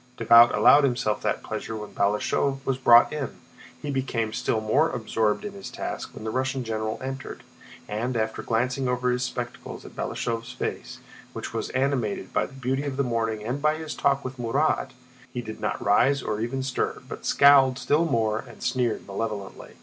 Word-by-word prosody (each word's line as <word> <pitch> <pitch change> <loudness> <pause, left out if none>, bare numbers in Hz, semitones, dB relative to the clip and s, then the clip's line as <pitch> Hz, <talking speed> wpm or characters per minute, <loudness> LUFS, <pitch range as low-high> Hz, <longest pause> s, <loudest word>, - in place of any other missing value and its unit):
Davout 115 +1 +7
allowed 145 - +6
himself 120 -5 0
that - - -1
pleasure 110 - -5
when 105 -1 -7
Balashëv 135 +7 0
was 130 -1 -1
brought 120 0 +6
in. 145 -5 -4 0.5
He 145 - -2
became 120 -5 -1
still 110 - 0
more 110 +9 +2
absorbed 110 - -1
in 205 - -5
his 195 -1 -8
task - - -6
when - - -8
the 110 - -3
Russian 130 +1 -1
general 110 -1 -3
entered, 135 0 -6 0.4
and 120 +4 -2
after 110 0 -2
glancing 125 +3 0
over 125 0 +1
his 125 0 -1
spectacles 125 -1 -5
at - - -10
Balashëv's 115 +1 -3
face, 130 - -5 0.4
which - - -6
was - - -3
animated 125 -8 -1
by - - +1
the - - -17
beauty 135 +1 -2
of 135 -2 -3
the 140 - +2
morning 115 -3 -1
and 125 +6 -3
by 155 +1 +3
his 155 -1 -5
talk 140 -1 +1
with 130 0 -6
Murat, 135 +6 +1 0.4
he 125 - -4
did 110 -1 -8
not 105 - -1
rise 135 +7 +3
or 105 0 -2
even 130 +3 -2
stir, 130 -1 -2
but - - -8
scowled 135 -2 +6
still 150 +4 +2
more 110 -7 +1
and - - -11
sneered 125 -4 0
malevolently. 100 -1 -5
125 Hz, 185 wpm, -26 LUFS, 110-135 Hz, 0.5 s, Davout